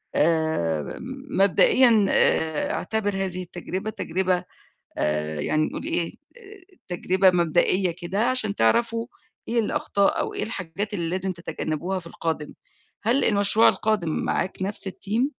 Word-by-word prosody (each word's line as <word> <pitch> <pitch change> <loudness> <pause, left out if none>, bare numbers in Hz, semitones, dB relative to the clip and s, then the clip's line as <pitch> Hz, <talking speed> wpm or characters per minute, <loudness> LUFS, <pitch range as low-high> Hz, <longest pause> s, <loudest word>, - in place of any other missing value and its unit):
آآ، 150 - 0 0.3
مبدئيًا 215 +3 +5
آآ 160 -2 +2
اعتبر 215 +2 -1
هذه 185 -1 -2
التجربة، 180 +4 -5
تجربة 185 -3 -1 0.6
آآ، 75 0 -1
يعني 155 - +1
نقول - - -6
إيه، 330 +2 -1
ت 395 - -13
تجربة 185 +2 +3
مبدئية 175 +1 +2
كده، 195 +6 0
عشان 220 -6 +1
تعرفوا 230 - +2 0.4
إيه 235 0 +2
الأخطاء، 200 -2 +1
أو - - -3
إيه - - -3
الحاجات 200 0 -4
اللي 170 -3 -2
لازم 185 +1 -1
تتجنبوها 170 +1 -3
في 170 - -12
القادم، 160 -3 -4 0.5
هل 245 +5 +2
المشروع 205 +1 +4
القادم 215 -6 0
معاك 185 - -1
نفس 200 0 0
الteam؟ 205 +6 -1
190 Hz, 130 wpm, -24 LUFS, 170-220 Hz, 0.6 s, مبدئيًا